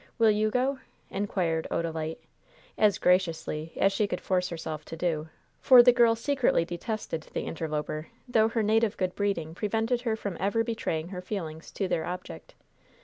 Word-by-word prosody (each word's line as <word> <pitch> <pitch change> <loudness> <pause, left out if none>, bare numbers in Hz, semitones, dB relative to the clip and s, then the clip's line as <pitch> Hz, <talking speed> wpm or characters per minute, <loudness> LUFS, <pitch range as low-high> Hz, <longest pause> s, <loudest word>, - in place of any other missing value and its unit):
Will 225 -2 +5
you 215 +1 +2
go?" 260 +3 0 0.3
inquired 180 -5 -1
Odalite, 160 -1 -2 0.6
as 210 -2 +3
graciously 165 -3 +1
as 195 0 +3
she 205 +1 +1
could 180 - -3
force 180 -1 0
herself 160 -2 -5
to 165 - -8
do; 160 -2 -1 0.3
for 250 -2 +8
the 245 - +8
girl 235 -2 +5
secretly 245 - +1
detested 175 -2 -4
the - - -1
interloper, 155 -1 -3 0.2
though 220 -3 +4
her 225 -1 0
native 220 0 +2
good 185 -1 -1
breeding 195 -6 -1
prevented 225 +5 0
her 230 -3 0
from 200 -5 -5
ever 205 +5 +1
betraying 175 -8 -2
her 180 -2 -6
feelings 165 -5 -5
to 195 - -1
their 165 -3 0
object. 180 +1 -7
190 Hz, 165 wpm, -28 LUFS, 165-220 Hz, 0.6 s, for